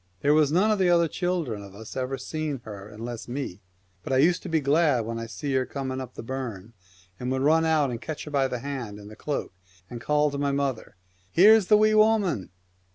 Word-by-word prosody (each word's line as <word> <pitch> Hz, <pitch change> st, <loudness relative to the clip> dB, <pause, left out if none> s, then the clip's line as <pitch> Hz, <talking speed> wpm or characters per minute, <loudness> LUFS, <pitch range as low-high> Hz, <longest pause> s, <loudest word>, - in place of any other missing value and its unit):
There 145 Hz, +1 st, +4 dB
was 150 Hz, -2 st, +4 dB
none 195 Hz, +7 st, +3 dB
of 210 Hz, -, +1 dB
the 185 Hz, -2 st, +3 dB
other 170 Hz, -1 st, +4 dB
children 165 Hz, -, -2 dB
of 100 Hz, -1 st, -12 dB
us 110 Hz, +1 st, -10 dB
ever 130 Hz, +1 st, -2 dB
seen 155 Hz, -3 st, -4 dB
her 100 Hz, -1 st, -9 dB
unless 115 Hz, +2 st, -7 dB
me; 120 Hz, -7 st, -5 dB, 0.4 s
but 95 Hz, -, -6 dB
I 130 Hz, -, +3 dB
used 175 Hz, +6 st, +3 dB
to 185 Hz, -, -7 dB
be 160 Hz, -1 st, +2 dB
glad 145 Hz, -4 st, +2 dB
when 115 Hz, +1 st, -4 dB
I 115 Hz, -, -5 dB
seen 115 Hz, +7 st, -4 dB
her 130 Hz, -1 st, +2 dB
coming 130 Hz, 0 st, -4 dB
up 130 Hz, -1 st, -9 dB
the -, -, -7 dB
burn, 115 Hz, -5 st, -6 dB, 0.5 s
and 125 Hz, +1 st, -3 dB
would 130 Hz, 0 st, 0 dB
run 160 Hz, +3 st, +4 dB
out 155 Hz, -4 st, +2 dB
and 120 Hz, -1 st, -5 dB
catch 155 Hz, -2 st, -5 dB
her 150 Hz, -, -9 dB
by 140 Hz, -2 st, +2 dB
the 125 Hz, -, -3 dB
hand 125 Hz, -7 st, -5 dB
and 105 Hz, 0 st, -11 dB
the -, -, -11 dB
cloak, 145 Hz, -3 st, -4 dB, 0.4 s
and 120 Hz, -1 st, -6 dB
call 150 Hz, +2 st, +2 dB
to 140 Hz, -, -4 dB
my 140 Hz, 0 st, +1 dB
mother, 140 Hz, -4 st, -2 dB, 0.2 s
" 95 Hz, +1 st, -37 dB
Here's 210 Hz, +2 st, +6 dB
the 210 Hz, -, +6 dB
Wee 215 Hz, 0 st, +4 dB
Woman 215 Hz, -, +3 dB
140 Hz, 235 wpm, -26 LUFS, 115-160 Hz, 0.5 s, Here's